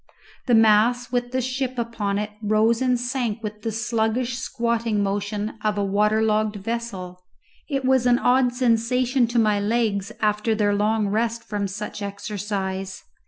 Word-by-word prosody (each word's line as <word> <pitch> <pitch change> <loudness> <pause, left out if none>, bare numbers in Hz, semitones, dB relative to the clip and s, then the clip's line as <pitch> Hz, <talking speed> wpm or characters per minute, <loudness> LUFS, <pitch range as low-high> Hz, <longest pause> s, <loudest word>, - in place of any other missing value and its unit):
The 240 - +5
mass 225 +3 +4
with 245 -1 -1
the 260 0 0
ship 255 0 -3
upon 225 -4 -2
it 210 +1 -3
rose 215 +2 +2
and 250 -2 +2
sank 245 -3 -2
with 210 0 -6
the 225 - -2
sluggish 230 +2 -1
squatting 230 -3 -1
motion 205 +2 -3
of 210 -1 0
a 205 - +1
water 210 +2 +2
logged 215 -1 +1
vessel. 195 -4 -5 0.5
It 275 -3 -1
was 260 -1 +3
an 240 0 +5
odd 250 0 +3
sensation 245 +1 +2
to 235 +1 -2
my 215 -3 +3
legs 205 -2 0
after 210 +1 +1
their 205 -1 +2
long 210 +1 +1
rest 230 +2 -1
from 205 -1 -3
such 210 +2 -6
exercise. 195 -2 -4
220 Hz, 160 wpm, -23 LUFS, 205-240 Hz, 0.5 s, The